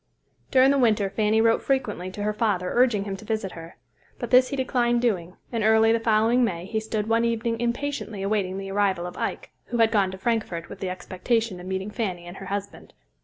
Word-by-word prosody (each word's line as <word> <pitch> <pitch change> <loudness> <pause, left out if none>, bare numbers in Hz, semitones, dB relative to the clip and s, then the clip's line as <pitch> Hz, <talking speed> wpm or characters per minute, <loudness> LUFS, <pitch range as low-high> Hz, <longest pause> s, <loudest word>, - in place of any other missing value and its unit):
During 265 +1 +5
the 280 - +2
winter 215 -5 +2
Fanny 215 +1 +2
wrote 225 0 +3
frequently 225 -9 -1
to 205 +2 -6
her 210 0 0
father 205 -5 0
urging 240 -5 +3
him 200 -1 -4
to 215 - -12
visit 215 -3 -2
her; 165 0 -11 0.4
but - - -5
this 255 0 +6
he 275 - -3
declined 245 -2 +1
doing, 185 -7 -1 0.2
and 230 -3 -1
early 220 +1 +5
the 230 - +2
following 225 +2 +3
May, 175 -6 -1
he 220 +3 -2
stood 215 -1 -3
one 230 +1 +2
evening 230 0 -1
impatiently 240 -4 -3
awaiting 195 -2 -1
the 195 0 -5
arrival 195 -3 +1
of 180 - -7
Ike, - - -4
who 240 - -3
had 225 -1 +4
gone 200 -4 +2
to 190 - -7
Frankfort 190 -5 -2
with - - -9
the 190 - -3
expectation 190 +2 -2
of 180 - -9
meeting 190 +2 -3
Fanny 185 -6 -3
and 175 +2 -9
her 195 - -8
husband. 200 +1 -6
215 Hz, 220 wpm, -25 LUFS, 190-230 Hz, 0.4 s, this